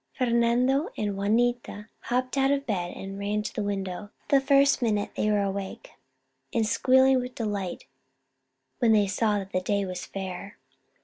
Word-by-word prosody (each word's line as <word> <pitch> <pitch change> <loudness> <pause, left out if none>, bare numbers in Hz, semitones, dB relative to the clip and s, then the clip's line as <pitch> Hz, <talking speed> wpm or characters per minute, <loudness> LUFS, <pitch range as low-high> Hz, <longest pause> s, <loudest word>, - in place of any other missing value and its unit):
Fernando 250 - +2
and 205 -2 -1
Juanita 220 +1 0 0.2
hopped 255 +1 -1
out 270 0 +3
of 280 0 0
bed 180 -5 -2
and 195 +1 -7
ran 210 +1 -1
to - - -5
the - - -2
window 200 -1 -3 0.2
the 275 -1 +5
first 275 0 +4
minute 210 -4 0
they 215 - 0
were 205 -1 +2
awake, 195 0 -5 0.6
and 225 - +1
squealed 260 +3 +4
with 250 0 -7
delight 205 -5 -3 0.9
when 230 -2 +4
they 210 -1 +4
saw 210 +2 +1
that 195 -1 -6
the 185 - 0
day 200 +1 0
was 180 -1 -6
fair. 190 0 -6
210 Hz, 165 wpm, -27 LUFS, 200-250 Hz, 0.9 s, the